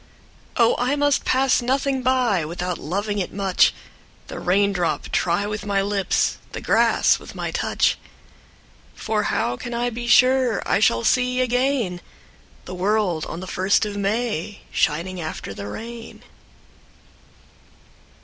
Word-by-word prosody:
Oh 235 -2 +4
I 250 +4 +1
must 290 -1 +1
pass 260 0 +2
nothing 265 +2 0
by 250 -8 +2
Without 175 +3 -4
loving 205 +6 -2
it 185 - -3
much, 195 -1 +3 0.6
The - - -6
raindrop 190 -1 0
try 175 +3 0
with 210 0 -4
my 200 -1 0
lips, 200 -1 0
The - - -4
grass - - +3
with - - -12
my - - -3
touch; - - 0 1.0
For 215 -1 -1
how 120 +1 -1
can 240 - -6
I 240 +1 -1
be 240 +1 -5
sure 255 -1 +4
I - - +2
shall 115 - +3
see 250 0 +2
again 250 -7 0 0.6
The 180 - -7
world 185 -3 0
on 170 - -6
the - - -6
first 190 +4 +1
of 205 -1 -5
May 205 -2 -2
Shining 175 +4 -1
after 155 -10 -6
the 100 +1 -7
rain? 230 - -8
205 Hz, 140 wpm, -22 LUFS, 180-245 Hz, 1.0 s, Oh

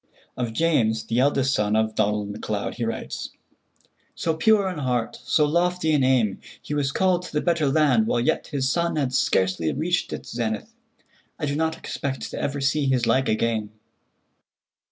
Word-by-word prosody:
Of 120 -2 -3
James, 115 -7 +2
the 115 +2 0
eldest 135 0 +2
son 105 -2 +1
of 110 0 +1
Donald 105 -1 0
MacLeod, 105 0 -3
he 120 - -3
writes: 115 - -4 0.9
"So 165 - 0
pure 200 +4 +3
in 180 -5 -4
heart, 125 -4 -1
so 150 - +3
lofty 175 +1 +1
in 145 -3 +3
aim, 120 -7 +2 0.2
he - - -6
was 145 -2 0
called 185 +2 +2
to 180 - -9
the 150 - 0
better 165 -2 +1
land 135 -7 +3
while 120 - +1
yet 120 - 0
his 135 -3 -1
sun 170 +5 0
had 135 -4 -1
scarcely 95 -9 +1
reached 175 +2 -1
its - - -6
zenith. 110 -3 -3 0.6
I - - -2
do 140 -1 -1
not 160 +1 0
expect 135 -4 -4
to - - -4
ever 140 0 -2
see 140 +1 +1
his 130 -3 +2
like 130 +3 +2
again." 110 -1 0
135 Hz, 175 wpm, -24 LUFS, 115-155 Hz, 0.9 s, pure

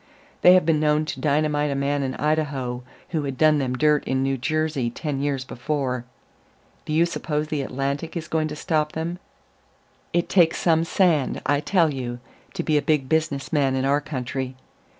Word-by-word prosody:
They 180 - +8
have 185 - +4
been 160 -2 +3
known 150 0 +2
to 130 - -5
dynamite 150 +1 +1
a 140 - -1
man 140 +1 0
in 130 -1 -2
Idaho 140 -5 -1 0.3
who 160 -3 -1
had 135 -3 -4
done 155 0 +4
them 125 -2 -1
dirt 150 +1 +3
in 130 0 0
New 135 0 +1
Jersey 145 -1 -1
ten 140 +2 -4
years 140 -2 -1
before. 130 -1 -3 0.8
Do - - -5
you 165 +2 +4
suppose 155 -3 -3
the 150 -2 -1
Atlantic 140 +5 -3
is 160 -1 -5
going 155 -1 0
to 150 - -6
stop 155 -1 -1
them?... 170 +2 -3 0.9
It 175 0 +1
takes 170 -4 +4
some 165 -1 +2
sand, 165 -6 +2
I 145 0 +2
tell 165 -1 +2
you, 125 -2 -4 0.4
to - - -2
be 155 -2 +2
a - - -3
big 145 -4 0
business 155 -3 -1
man 135 -3 +2
in 130 0 0
our 140 +2 +2
country. 130 -2 -4
150 Hz, 190 wpm, -24 LUFS, 135-155 Hz, 0.9 s, They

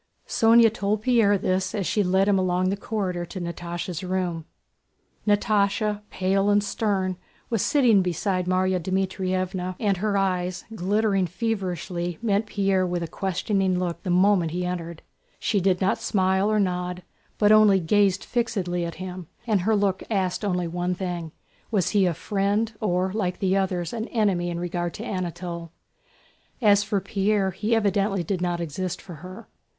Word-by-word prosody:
Sónya 225 -1 +5
told 210 -1 -1
Pierre 225 -5 +4
this 185 0 -1
as 200 -3 -1
she 210 - +1
led 190 +1 +2
him 200 -2 +3
along 185 0 +1
the - - 0
corridor 195 -4 -3
to 185 - -7
Natásha's 175 +1 -5
room. 180 -3 -2 0.8
Natásha, 210 0 +2
pale 195 +2 +1
and 205 0 +3
stern, 195 -3 -1 0.3
was 225 -4 +1
sitting 240 -9 +4
beside 180 +1 -1
Márya 185 0 +1
Dmítrievna, 185 0 -2
and 200 -3 +1
her 205 +1 0
eyes, 185 -2 -1
glittering 200 -1 +1
feverishly, 180 -4 -3
met 215 -1 0
Pierre 195 -3 +1
with 175 -1 -1
a - - -3
questioning 190 +1 0
look 180 -2 -2
the 185 - -5
moment 180 -1 +3
he 180 +2 -3
entered. 170 -2 -5 0.3
She 205 -3 0
did 185 -1 +2
not 190 0 +1
smile 190 +1 +1
or 215 - +2
nod, 180 -2 -1 0.3
but 210 0 +4
only 215 -3 +6
gazed 195 +2 +2
fixedly 200 -8 -1
at 170 -1 -4
him, 185 -1 -7 0.2
and 215 -5 +2
her 220 +4 +2
look 200 -2 +1
asked 190 -2 -1
only 180 -3 0
one 175 +2 -2
thing: 175 -3 -4 0.4
was 200 -6 +1
he 200 -3 +3
a 170 - 0
friend, 205 +5 0
or 185 -2 0
like 185 -4 -1
the 190 -1 +1
others 180 -2 -1
an 225 0 -3
enemy 195 -6 +1
in 170 0 -3
regard 175 -1 -3
to 225 - -6
Anatole? 175 -4 -4 0.9
As 205 -4 +5
for 205 0 0
Pierre, 200 0 0
he 215 +5 0
evidently 200 -3 +1
did 180 +1 -2
not 175 -1 -1
exist 170 +2 -3
for 175 -5 -10
her. 185 +5 -10
190 Hz, 165 wpm, -25 LUFS, 180-205 Hz, 0.9 s, only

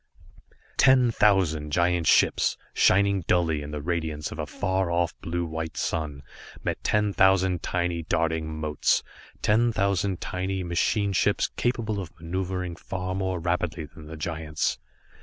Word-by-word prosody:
Ten 130 -3 +5
thousand 90 -9 +2
giant 85 0 +2
ships, - - +4 0.2
shining 100 0 +4
dully 80 -4 +2
in 75 - -7
the 75 -1 -5
radiance 80 -3 -2
of 75 - -7
a 75 - -3
far 95 +1 -1
off 85 -1 +1
blue 85 +1 -2
white 80 0 -5
sun, 75 -4 -2 0.4
met - - -3
ten 105 -1 +1
thousand 95 -2 +3
tiny, 85 -1 -1
darting 80 -1 0
motes, 75 -2 +1 0.4
ten 115 +3 +3
thousand 100 -3 0
tiny 95 +1 -3
machine 100 +4 +1
ships 100 +2 +2
capable 115 -4 -1
of 85 -3 -8
maneuvering 90 +1 -3
far 95 +1 -4
more 95 -1 -1
rapidly 85 -1 -1
than 80 0 -13
the 80 +1 -8
giants. 80 -2 -2
90 Hz, 140 wpm, -26 LUFS, 80-95 Hz, 0.4 s, Ten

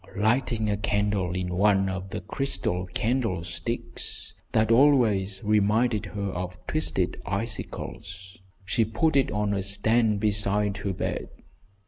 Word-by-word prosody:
Lighting 110 +1 +1
a 105 -1 0
candle 100 -3 0
in 90 -1 -2
one 95 +1 +3
of 95 0 -4
the - - -5
crystal 95 -5 -2
candlesticks 95 -3 -2 0.2
that 110 +1 +2
always 115 -8 +4
reminded 105 +1 +2
her 100 -1 -3
of 90 0 -5
twisted 125 - -1
icicles, 95 -2 -5 0.3
she 95 +5 +2
put 130 +8 0
it 135 -2 +3
on 105 -1 0
a 100 - 0
stand 105 +2 +2
beside 105 -1 +1
her 100 -1 -3
bed. - - -3
105 Hz, 125 wpm, -26 LUFS, 95-110 Hz, 0.3 s, always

